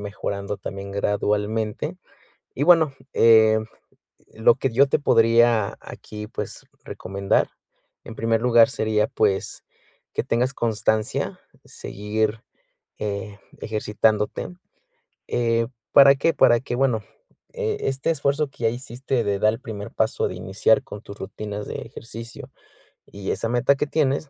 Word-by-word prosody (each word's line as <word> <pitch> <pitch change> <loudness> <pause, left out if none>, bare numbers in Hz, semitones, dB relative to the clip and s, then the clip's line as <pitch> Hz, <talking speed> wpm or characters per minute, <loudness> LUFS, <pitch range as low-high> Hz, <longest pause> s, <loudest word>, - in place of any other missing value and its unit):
mejorando 100 0 -4
también 100 0 -7
gradualmente. 105 +1 -1 0.6
Y, 140 - -2
bueno, 160 -4 +5 0.2
em, 110 -1 +5 0.7
lo 110 +1 +4
que 135 - -1
yo 135 +5 +5
te 140 - +1
podría 115 -4 +3
aquí, 105 0 -9
pues, - - -7 0.2
recomendar, 100 +1 -1 0.5
en - - -9
primer 115 0 0
lugar, 120 -2 +5
sería, 110 -1 0
pues, 100 -3 -1 0.5
que - - -1
tengas 125 +3 0
constancia, 110 -2 -1 0.3
seguir, 110 +2 -3 0.6
eh, 100 0 -4 0.2
ejercitándote, 105 0 0 0.8
eh, 115 -1 +1 0.2
¿para 140 -1 +8
qué? 165 +4 +1
Para 120 -1 +5
que, 125 - -4
bueno, 125 -4 +1 0.5
eh, 445 -3 -2
este 135 +4 0
esfuerzo 145 0 0
que 120 - -6
ya - - +5
hiciste 125 +1 -3
de 100 -1 -1
dar 110 +2 +3
el 115 - -7
primer 105 -5 -7
paso 110 +1 0
de 90 - -6
iniciar 95 +10 +2
con 105 -6 -9
tus 100 -2 -11
rutinas 105 +1 -6
de - - -6
ejercicio 115 0 -10 0.5
y 100 -1 -7
esa 115 - -2
meta 125 +3 +3
que 150 - -1
tienes, 145 -1 0
110 Hz, 135 wpm, -23 LUFS, 105-125 Hz, 0.8 s, para